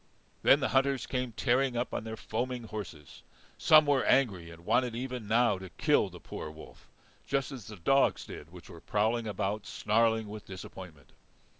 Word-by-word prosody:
Then -, -, +5 dB
the -, -, +1 dB
hunters 135 Hz, -2 st, +2 dB
came 125 Hz, -2 st, -2 dB
tearing 125 Hz, +2 st, +1 dB
up 120 Hz, -, -2 dB
on -, -, -2 dB
their 110 Hz, 0 st, -5 dB
foaming 125 Hz, +1 st, -3 dB
horses. 100 Hz, -9 st, -8 dB, 0.4 s
Some 155 Hz, 0 st, +7 dB
were 140 Hz, -3 st, +3 dB
angry, 100 Hz, -11 st, +2 dB
and 85 Hz, +1 st, -13 dB
wanted 125 Hz, +1 st, +2 dB
even 125 Hz, -2 st, -5 dB
now 115 Hz, -2 st, +3 dB
to 95 Hz, -1 st, -9 dB
kill -, -, +2 dB
the -, -, -12 dB
poor 75 Hz, -, -7 dB
wolf, 80 Hz, 0 st, -14 dB, 0.4 s
just 135 Hz, +1 st, -1 dB
as 125 Hz, -7 st, -8 dB
the 105 Hz, -, -8 dB
dogs 135 Hz, +10 st, +2 dB
did 75 Hz, -, -9 dB
which 90 Hz, -2 st, -13 dB
were 85 Hz, -, -12 dB
prowling 110 Hz, +2 st, 0 dB
about 100 Hz, +1 st, -2 dB
snarling 110 Hz, 0 st, +1 dB
with 105 Hz, 0 st, -8 dB
disappointment. 90 Hz, -5 st, -10 dB
110 Hz, 175 wpm, -30 LUFS, 95-125 Hz, 0.4 s, Some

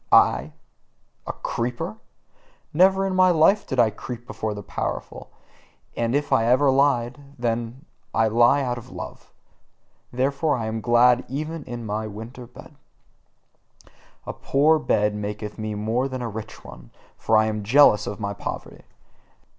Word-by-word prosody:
I, -, -, +4 dB, 0.7 s
a -, -, -1 dB
creeper? 120 Hz, -2 st, -4 dB, 0.8 s
Never 190 Hz, +4 st, +4 dB
in 190 Hz, -, -1 dB
my 185 Hz, 0 st, +5 dB
life 180 Hz, +5 st, +3 dB
did 130 Hz, -, -2 dB
I 115 Hz, -2 st, +4 dB
creep 120 Hz, +3 st, -8 dB
before 110 Hz, -3 st, -4 dB
the 100 Hz, -, -7 dB
powerful; -, -, -5 dB, 0.7 s
and 115 Hz, +2 st, 0 dB
if 145 Hz, 0 st, 0 dB
ever 125 Hz, +5 st, +4 dB
I -, -, +5 dB
lied, 130 Hz, -2 st, +1 dB, 0.2 s
then 120 Hz, -1 st, -1 dB, 0.2 s
did -, -, -25 dB, 0.3 s
I 115 Hz, 0 st, +3 dB
lie 120 Hz, +5 st, +4 dB
out 120 Hz, -2 st, -2 dB
of -, -, -14 dB
love. -, -, -9 dB, 0.8 s
Therefore 140 Hz, +4 st, 0 dB
am 110 Hz, -1 st, -3 dB
I -, -, -5 dB
glad 120 Hz, +1 st, +4 dB
even 155 Hz, +4 st, -4 dB
in 120 Hz, -2 st, -7 dB
my 110 Hz, +1 st, -3 dB
winter 115 Hz, +4 st, -9 dB
bed. 125 Hz, +5 st, -14 dB, 1.5 s
A -, -, -5 dB
poor 155 Hz, +3 st, +2 dB
bed 105 Hz, -7 st, +1 dB
warmeth 105 Hz, +1 st, -5 dB
me 110 Hz, -1 st, -3 dB
more 110 Hz, +5 st, -1 dB
than 130 Hz, -2 st, -5 dB
a 115 Hz, -, -3 dB
rich 110 Hz, +1 st, -9 dB
one, -, -, -12 dB, 0.3 s
for 110 Hz, -, +2 dB
I 110 Hz, -, +4 dB
am 110 Hz, -1 st, -2 dB
jealous 110 Hz, -1 st, +5 dB
of 100 Hz, -, -5 dB
my 100 Hz, -1 st, -3 dB
poverty. 100 Hz, -, -7 dB
120 Hz, 155 wpm, -23 LUFS, 110-140 Hz, 1.5 s, my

